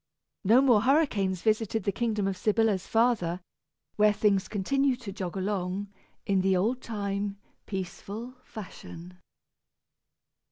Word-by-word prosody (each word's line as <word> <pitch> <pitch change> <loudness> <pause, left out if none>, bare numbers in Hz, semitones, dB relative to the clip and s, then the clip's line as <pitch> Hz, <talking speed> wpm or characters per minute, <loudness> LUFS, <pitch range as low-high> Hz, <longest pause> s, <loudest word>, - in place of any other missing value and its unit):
No 225 +6 +6
more 240 -6 +5
hurricanes 220 - +2
visited 220 -1 +1
the 200 - +1
kingdom 215 -2 -1
of 195 - -1
Sybilla's 215 -1 +1
father, 225 -7 +2 0.6
where 210 0 +5
things 200 -2 +2
continued 260 +6 +1
to 205 - -6
jog 190 -1 -5
along 190 0 -2 0.4
in 195 -1 +2
the 190 0 +3
old 235 +7 0
time 200 -2 -3 0.3
peaceful 200 +5 -5
fashion. 180 -3 -10
205 Hz, 120 wpm, -28 LUFS, 190-225 Hz, 0.6 s, No